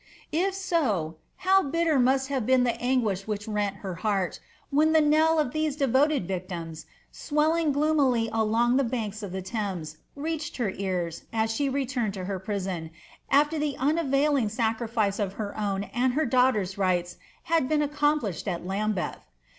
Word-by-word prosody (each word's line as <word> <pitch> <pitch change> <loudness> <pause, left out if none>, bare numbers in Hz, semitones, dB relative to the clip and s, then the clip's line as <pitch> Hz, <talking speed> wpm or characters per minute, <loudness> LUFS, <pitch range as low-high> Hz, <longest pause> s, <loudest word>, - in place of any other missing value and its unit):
If 375 +5 +1
so, 245 - 0 0.3
how 385 +1 +6
bitter 325 -1 +1
must 265 +2 +2
havt 260 -5 -1
been 260 -1 +4
the 245 - +2
aiiguiah 230 -6 0
which 210 -1 -3
rent 205 -2 -1
her 190 - -3
heart, 195 -4 0 0.3
whan 310 +3 +3
the 320 - +6
knell 310 +2 +4
of 300 -5 +1
tliese 310 -2 -1
devoted 275 - +2
victims, 175 -4 -5 0.2
swelling 310 +1 +1
gloomily 280 -5 +2
along 230 +3 +2
ths 260 -4 0
banks 220 -4 -3
of 200 -3 -6
the 190 0 -4
Thames, 190 -7 -4 0.2
reached 320 +2 -4
her 230 -6 0
ear 185 -3 -2 0.2
an 220 -1 +1
she 275 +5 0
returned 255 -6 -1
to 185 -1 -5
her 195 0 -3
prison, 190 -4 -3 0.4
aftrr 295 +3 +3
the 295 -2 -1
unavailing 280 -3 +2
sacrifice 220 -2 0
of 195 -2 -1
her 205 -1 -5
own 200 -2 -1
and 245 +4 0
her 310 +4 +1
daughter's 235 -7 +2
rights 180 -2 0 0.3
liacl 325 -5 +2
been 300 -1 +2
accomplisheii 290 - 0
ai 180 -3 0
l^uiiljetb! 195 +1 -2
240 Hz, 160 wpm, -27 LUFS, 200-295 Hz, 0.4 s, how